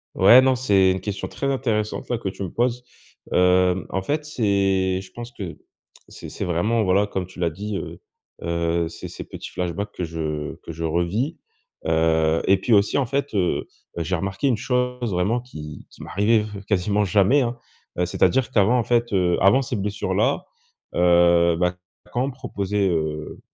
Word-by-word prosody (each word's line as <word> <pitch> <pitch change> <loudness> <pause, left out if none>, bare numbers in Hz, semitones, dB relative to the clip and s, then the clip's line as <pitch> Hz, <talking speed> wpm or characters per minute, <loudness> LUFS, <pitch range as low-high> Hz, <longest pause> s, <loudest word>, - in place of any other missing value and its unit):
Ouais 125 +2 +8
non, 130 0 +3
c'est 100 -7 +3
une 95 - -1
question 100 +1 -4
très 140 - -3
intéressante 115 -6 -1
là, 120 - 0
que 110 - -5
tu 95 +1 -4
me 90 - -5
poses, 125 +1 0 0.5
hem, 90 0 +3
en 95 - -2
fait, 150 +9 -2
c'est 95 -8 +1
je 95 -1 -14
pense 120 0 -8
que 95 -7 -7 0.5
c'est - - -10
c'est - - -6
vraiment 105 +7 +1
voilà, 100 +1 +2
comme 95 -2 -3
tu 90 0 -14
l'as 85 -1 +1
dit, 100 +5 -5
heu, - - -7 0.4
heu, 85 0 -1
c'est 85 0 -8
ces - - -8
petits - - -9
flashbacks 90 +3 -3
que 90 - -4
je 80 -2 -4
que 85 - -7
je 85 +1 -6
revis, 85 - -1 0.5
heu, 80 0 +2
et 95 - +5
puis 115 - +1
aussi 100 -1 +3
en 140 - +2
fait, 140 +2 -2
heu, 90 -3 0 0.3
j'ai 85 +2 -1
remarqué 95 +7 -2
une 125 -4 +2
chose 125 -1 -1
vraiment 95 +7 +1
qui 75 - -10
qui - - -13
m'arrivait 105 +2 +2 0.2
quasiment 105 +1 +1
jamais 100 +8 +4
hein. 120 -1 -2 0.4
Heu, 90 - +1
c'est-à-dire 95 +8 +1
qu'avant 110 +2 +3
en - - +1
fait, 120 -1 +1
heu, 90 -2 +2
avant 100 +8 +5
ces 130 -3 -3
blessures 105 +1 -2
là, - - +1 0.5
heu, 85 -1 +4
bah, 90 +1 0 0.3
quand 125 +2 0
on - - -3
me 140 - -5
proposait, 105 -6 -1
heu, 80 -2 -3
95 Hz, 185 wpm, -23 LUFS, 85-120 Hz, 0.5 s, Ouais